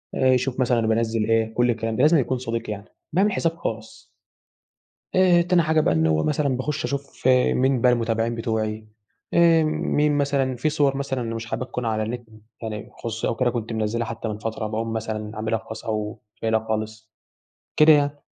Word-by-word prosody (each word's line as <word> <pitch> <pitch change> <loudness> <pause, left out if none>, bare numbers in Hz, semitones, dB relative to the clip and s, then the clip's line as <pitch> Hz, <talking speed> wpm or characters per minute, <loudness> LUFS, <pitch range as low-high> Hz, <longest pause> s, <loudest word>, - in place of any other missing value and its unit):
آآ 130 - +2
يشوف 125 +1 0
مثلًا 120 -3 +2
بانزِّل 110 0 +1
إيه، 110 0 +2
كل 120 +1 +2
الكلام 115 -1 -1
ده 125 - 0
لازمًا 155 +3 +5
يكون 130 0 0
صديق 115 -2 -4
يعني. 100 -1 -5 0.3
باعمل 195 +5 +3
حساب 165 -3 0
خاص. 110 -7 -6 1.1
آآ 185 -2 +5
تاني 175 0 +3
حاجة 160 -1 +2
بقى 150 - +2
إن 80 0 +2
هو 80 0 +2
مثلًا 140 -3 0
باخش 140 +3 -3
أشوف 140 -2 -4
مين 130 0 +3
بقى 125 - +5
المتابعين 115 -1 0
بتوعي، 110 -1 -2 0.5
آآ 165 -1 +5
مين 150 -1 +1
مثلًا 140 -2 +1
في 130 +6 0
صور 140 -2 +1
مثلًا 130 -4 -3
مش 115 0 -5
حاببها 125 +2 -4
تكون 125 -1 -4
على 110 -1 0
النت 120 +2 -5 0.3
يعني 110 -2 -5
خصوصي 115 -1 -4
أو 115 - -1
كده 125 +1 +1
كنت 115 -2 -4
منزلها 110 +1 -1
حتى 115 0 -5
من 105 -1 -3
فترة 110 0 -4
باقوم 115 +1 -3
مثلًا 110 -1 -4
عاملها 110 +1 -1
خاص 110 0 -9
أو 105 -1 -3 0.2
شايلها 110 0 0
خالص. 110 0 -4 0.7
كده 155 +1 +7
يعني، 145 -1 +2
115 Hz, 185 wpm, -23 LUFS, 110-140 Hz, 1.1 s, كده